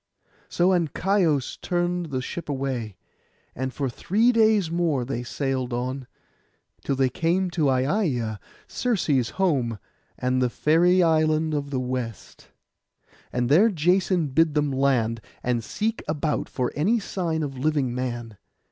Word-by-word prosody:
So 175 +1 +2
Ancaios 175 -4 +1
turned 175 -1 -1
the 130 -3 -3
ship 170 +4 -6
away; 130 -7 -3 0.6
and 130 +1 -3
for 140 0 -2
three 210 - +2
days 215 -7 +3
more 165 -7 0
they 125 -1 -3
sailed 130 0 -2
on, 130 +2 -3 0.8
till 140 - 0
they 135 0 +3
came 180 +5 0
to 155 -5 +1
Aiaia, 130 - 0 0.3
Circe's 155 - 0
home, 135 - +1 0.4
and 130 0 0
the 125 - +2
fairy 175 +7 +3
island 155 -1 +2
of 145 -1 -2
the 135 -2 -1
West. 125 - -5 0.8
And 125 -1 0
there 175 - +5
Jason 180 -2 +1
bid 160 +3 +2
them 150 -1 +1
land, 125 -4 +1 0.2
and 120 -2 0
seek 220 - -2
about 150 0 -1
for 125 -2 -2
any 205 +11 +2
sign 170 -6 -2
of 135 -3 -5
living 140 -3 0
man. 120 -4 -4
145 Hz, 140 wpm, -25 LUFS, 130-175 Hz, 0.8 s, there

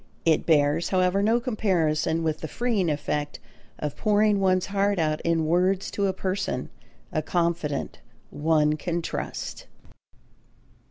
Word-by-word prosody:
It 160 -2 +2
bears, 150 +1 +3
however, 185 +1 +2
no 225 +3 +3
comparison 170 - 0
with 155 -1 -1
the 160 - -5
freeing 220 -4 0
effect 145 0 -2 0.4
of 150 -1 -4
pouring 210 -1 +2
one's 185 -1 +2
heart 200 0 0
out 155 -2 0
in 165 -1 +1
words 180 +4 +1
to 200 -1 0
a - - +2
person, 190 -8 -3 0.4
a 155 - 0
confidant 170 -2 -1 0.3
one 150 0 +2
can 170 +2 -2
trust. - - -5
170 Hz, 130 wpm, -25 LUFS, 155-195 Hz, 0.4 s, bears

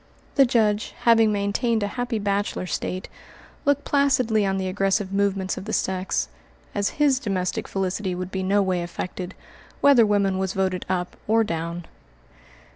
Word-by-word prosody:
The 275 -2 +5
Judge, 220 -3 +1
having 225 -2 +5
maintained 210 +2 0
a - - 0
happy 245 -2 -2
bachelor 200 -2 -1
state, 185 +1 -3 0.6
looked 285 0 +2
placidly 255 -7 +2
on 195 0 0
the 190 -1 -2
aggressive 195 +1 0
movements 195 -1 0
of - - -9
the 220 - -4
sex, 190 0 0 0.5
as 200 -1 -1
his 285 -3 +3
domestic 185 -6 -2
felicity 190 0 -2
would 185 +1 -5
be 190 - -2
no 200 +2 +2
way 185 -2 0
affected, 180 +2 -5 0.4
whether 280 -5 +6
woman 200 -3 +2
was 190 0 -1
voted 190 -1 -1
up 180 -1 -2
or 225 +1 +4
down. 170 -2 -4
200 Hz, 155 wpm, -24 LUFS, 185-225 Hz, 0.6 s, whether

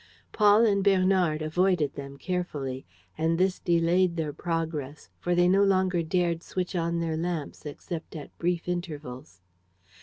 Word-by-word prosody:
Paul 210 +1 +5
and 200 -3 +2
Bernard 185 -5 +3
avoided 165 -2 +1
them 140 -1 -8
carefully; 145 - -4 0.3
and 165 +1 +1
this 185 +1 +1
delayed 170 +1 +2
their 155 -2 -2
progress, 160 -4 -4
for 175 0 0
they 175 0 +4
no 195 +2 +4
longer 185 -3 +2
dared 170 0 0
switch 185 +1 -4
on 170 0 0
their 165 -1 -1
lamps 160 -2 -4
except 160 +3 -7
at 150 - -9
brief 175 0 -1
intervals. 150 - -6
170 Hz, 145 wpm, -27 LUFS, 155-185 Hz, 0.3 s, Paul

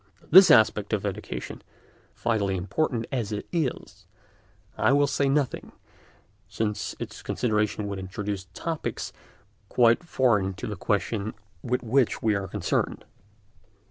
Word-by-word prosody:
Of - - -23
this 190 +3 +10
aspect 110 -2 +4
of 105 -1 0
education, 90 -11 -5 0.5
vitally 100 -5 0
important 115 - -1
as 115 -5 -2
it 105 -1 -4
is, 130 - -3 0.7
I 135 - +3
will 145 0 +4
say 140 0 +1
nothing, 140 -2 -1 0.8
since 105 0 -2
its - - -7
consideration 105 -3 -1
would 100 -1 -4
introduce 95 +1 -5
topics 165 -2 -4 0.6
quite 120 +6 +4
foreign 105 - +1
to - - -6
the 105 - -4
question 105 +2 -1 0.3
with 125 0 -1
which 125 +1 +2
we 110 -1 +3
are 100 -1 -2
concerned. 95 -1 -2
110 Hz, 130 wpm, -26 LUFS, 100-130 Hz, 0.8 s, this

